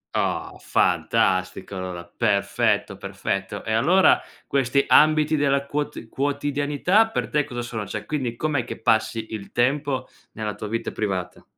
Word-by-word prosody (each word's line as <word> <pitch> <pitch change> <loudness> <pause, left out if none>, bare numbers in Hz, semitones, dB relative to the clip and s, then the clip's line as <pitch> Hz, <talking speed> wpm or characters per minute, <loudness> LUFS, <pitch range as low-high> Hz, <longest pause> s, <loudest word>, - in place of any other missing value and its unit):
Oh, - - -1
fantastico, 95 +1 +1
allora! 90 -2 -5
Perfetto, 105 +1 0
perfetto. 100 0 -4
E 110 - -2
allora 190 - +5 0.3
questi 140 0 +2
ambiti 155 0 +5
della 140 -1 +1
quot 145 -5 -4
quotidianità 145 - +1
per 225 - -2
te 150 -1 +2
cosa 120 -2 -5
sono? 115 -3 -4
Cioè, - - -5
quindi 130 -6 -2
com'è 145 -3 0
che 120 - -7
passi 110 0 0
il 105 -2 -7
tempo 130 +1 0 0.2
nella 105 -2 -4
tua 105 - -6
vita 115 +1 -2
privata? 95 -4 -3
120 Hz, 140 wpm, -24 LUFS, 105-145 Hz, 0.3 s, allora